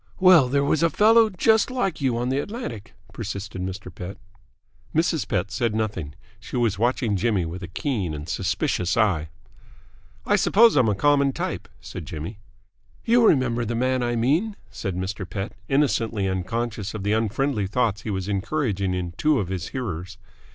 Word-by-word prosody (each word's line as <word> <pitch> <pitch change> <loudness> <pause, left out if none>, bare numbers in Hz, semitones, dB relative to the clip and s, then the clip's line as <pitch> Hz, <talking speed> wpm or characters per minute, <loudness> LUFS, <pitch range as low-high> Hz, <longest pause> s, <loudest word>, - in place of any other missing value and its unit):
"Well, 180 -8 +7
there 140 +2 +2
was 145 +2 +1
a 170 - +4
fellow 220 +4 +5
just 220 +3 +3
like 245 - -1
you 130 -4 +1
on 120 +1 -1
the 135 +2 +1
Atlantic," 145 - -6 0.2
persisted 100 -2 -5
Mr. 95 -1 -6
Pett. 90 +3 -7 0.8
Mrs. 160 -1 +1
Pett 100 -1 -1
said 115 -4 0
nothing. 105 -9 -3 0.2
She - - -6
was 115 -5 +1
watching 120 -2 +1
Jimmy 100 -3 +1
with 85 +3 -6
a 90 - -6
keen 95 - -2
and 75 +2 -7
suspicious 90 +1 -1
eye. 90 -9 +2 1.0
"I - - +3
suppose 230 +2 +5
I'm 125 -6 +4
a 105 - +1
common 140 +3 +3
type," - - -4
said - - -8
Jimmy. 85 +8 -6 0.7
"You 235 0 +5
remember 120 -5 +2
the 115 +1 -2
man 130 +2 +1
I 120 0 0
mean," 155 - +1 0.2
said 95 -4 -4
Mr. 95 +2 -3
Pett, 100 +1 -4 0.2
innocently 115 -7 +1
unconscious 105 +3 -3
of 105 - -5
the 105 +1 +1
unfriendly 110 0 0
thoughts 110 0 0
he 115 - -6
was 95 -2 -2
encouraging 100 -2 -1
in 90 -1 -3
two 155 -1 +3
of 90 - -3
his 90 -3 -3
hearers. 95 -8 -5
115 Hz, 170 wpm, -24 LUFS, 95-140 Hz, 1.0 s, Well